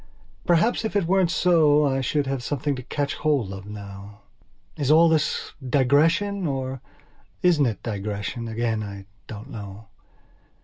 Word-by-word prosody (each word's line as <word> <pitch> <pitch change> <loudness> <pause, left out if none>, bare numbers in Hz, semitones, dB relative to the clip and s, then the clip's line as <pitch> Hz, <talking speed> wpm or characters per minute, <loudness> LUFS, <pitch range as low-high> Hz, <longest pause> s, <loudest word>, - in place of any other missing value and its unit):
Perhaps 175 +8 +3
if 220 - -3
it 200 -4 +2
weren't 185 0 +2
so 155 -4 +4
I 135 -1 +1
should 145 +3 0
have 135 -1 -2
something 145 +2 -2
to 130 - -6
catch 145 +3 -2
hold 140 -11 0
of 100 +1 -9
now. 100 0 -10 0.5
Is 145 -4 -2
all 160 +2 +7
this 155 -2 0
digression 160 +9 +2
or 130 -2 -3 0.6
isn't 165 -6 +4
it 110 -4 -4
digression? 105 +2 -4
Again 115 -1 -1
I 100 -2 -7 0.2
don't 110 +5 -9
know. 100 -1 -9
135 Hz, 145 wpm, -24 LUFS, 110-155 Hz, 0.6 s, all